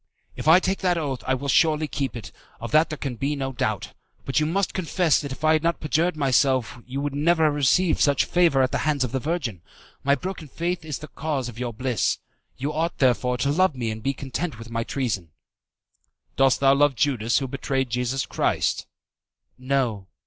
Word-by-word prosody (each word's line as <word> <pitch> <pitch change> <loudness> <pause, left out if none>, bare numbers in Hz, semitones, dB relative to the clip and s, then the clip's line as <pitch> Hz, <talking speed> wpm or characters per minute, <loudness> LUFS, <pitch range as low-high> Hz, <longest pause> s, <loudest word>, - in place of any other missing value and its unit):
"If - - -6
I 165 +3 +8
take 190 +1 -1
the 180 -2 +1
oath, 135 -5 -3
I 130 - +2
will 140 +2 -5
surely 155 +2 +3
keep 135 -3 -3
it, 115 - -7 0.3
of 115 -1 -6
that 155 +2 +4
there 155 - -5
can 135 -4 -4
be 140 +4 -1
no 135 -1 -3
doubt; 120 - -2 0.3
but 135 - +1
you 150 - +1
must 195 +4 0
confess 175 -2 +1
that 140 -2 -6
if 135 - -8
I 155 0 +5
had 155 - +2
not 170 +1 0
perjured 160 +3 0
myself 130 -4 +2
you 130 +2 -4
would 145 -1 -2
never 160 +3 +2
have 150 - +3
received 150 +5 +2
such 140 -3 +3
favour 170 -7 +3
at 130 - 0
the - - 0
hands 150 -3 +1
of 125 - -3
the 135 - -1
Virgin. 135 - -3 0.4
My 140 +1 +4
broken 180 -1 -6
faith 170 +5 -3
is 155 -3 -4
the 155 - -9
cause 140 -4 -3
of 120 0 -10
your 125 -1 -2
bliss. 125 -1 0 0.4
You 140 +4 -3
ought, 165 +3 -1
therefore, 125 -1 +2
to 140 +3 0
love 185 0 +2
me 115 -3 -2
and 110 - -5
to - - -16
be 135 - 0
content 140 +2 -4
with 115 +1 -10
my 115 0 -1
treason." 105 - -3 1.0
"Dost 135 0 +3
love 140 +1 +4
Judas 120 -4 +1
who 135 - -1
betrayed 135 -1 -2
Jesus 125 +2 -1
Christ?" - - 0 0.7
"No." 130 -7 -1
140 Hz, 210 wpm, -24 LUFS, 125-155 Hz, 1.0 s, I